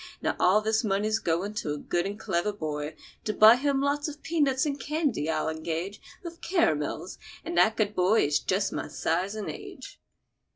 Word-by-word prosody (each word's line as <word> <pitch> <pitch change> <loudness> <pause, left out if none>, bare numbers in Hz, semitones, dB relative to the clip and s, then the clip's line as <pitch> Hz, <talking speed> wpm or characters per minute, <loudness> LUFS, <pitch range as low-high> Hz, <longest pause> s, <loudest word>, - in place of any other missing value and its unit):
Now - - -1
all 195 +4 +4
this 220 +2 +1
money's 215 +1 +1
goin' 180 +2 -1
to 150 - -2
a - - -6
good 175 +5 -1
and 205 +1 -6
clever 190 0 0
boy, 155 -5 -4 0.3
to 215 - -1
buy 215 +2 +8
him 275 +1 0
lots 285 +1 0
of 300 0 -8
pea 330 0 -2
nuts 265 -1 +2
and 285 -1 -2
candy, 290 - -1
I'll 160 - 0
engage—with 170 - -6
caramels; 180 - 0 0.3
and - - -4
that 220 +5 +4
good 210 -1 +1
boy 185 +5 +3
is 145 0 +2
just 195 +2 0
my - - -3
size 185 +5 -1
and 215 -2 -5
age." 410 +4 -9
210 Hz, 190 wpm, -27 LUFS, 175-275 Hz, 0.3 s, buy